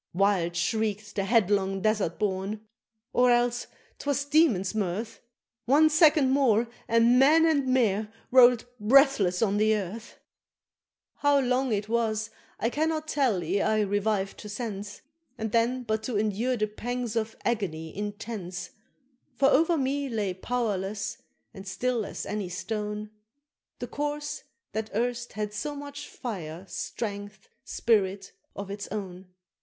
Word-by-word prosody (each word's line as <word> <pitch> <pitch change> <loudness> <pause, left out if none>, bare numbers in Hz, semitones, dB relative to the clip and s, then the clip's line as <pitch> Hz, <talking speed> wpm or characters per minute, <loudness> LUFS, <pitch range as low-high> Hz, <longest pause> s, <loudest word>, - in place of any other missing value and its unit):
Wild 185 -3 +2
shriek'd 210 +3 -1
the 195 - 0
headlong 195 -3 +2
Desert 215 -6 +1
Born 205 +1 -2 0.5
or 250 0 +4
else 240 0 +2 0.3
'twas 280 -1 -1
demon's 285 - +3
mirth, 215 +2 -3 0.4
One 305 +5 +5
second 305 -3 +5
more, 240 -4 +3 0.2
and 230 +2 +4
Man 310 +5 +6
and 290 -5 +2
Mare 220 -5 +1 0.2
roll'd 245 -2 +6
breathless 220 -5 +4
on 205 -2 +1
the 215 +1 +3
earth! 210 +3 -6 1.0
How 285 -1 +3
long 255 0 +1
it 205 -1 -1
was 220 -1 0 0.3
I 230 - 0
cannot 315 +1 -1
tell 255 - +1
ere 190 +5 0
I 215 0 +2
revived 205 -1 -1
to 210 - -8
sense, 205 -2 -5 0.4
And 220 -2 -3
then 240 +3 +1
but 220 -2 -1
to 230 -2 -2
endure 220 +4 0
the 215 - +1
pangs 235 +2 -4
of 225 -1 -1
agony 175 -9 -2
intense; 205 -4 -5 0.6
For 275 +2 +4
over 330 +4 +3
me 280 0 -1
lay 210 -5 -1
powerless, 210 -1 -2 0.3
and 195 0 -10
still 240 +2 -1
as - - -6
any 205 -3 -3
stone, 210 +2 -4 0.7
The 245 - -5
Corse 295 +3 -4 0.3
that 220 0 -3
erst 240 +1 -1
had 210 -1 -3
so 290 +7 -4
much 285 0 -8
fire, 180 -7 -6
strength, 205 - -6
spirit, 195 -3 0 0.2
of 200 -1 -6
its 200 0 -5
own. 190 -3 -6
220 Hz, 140 wpm, -27 LUFS, 200-250 Hz, 1.0 s, Man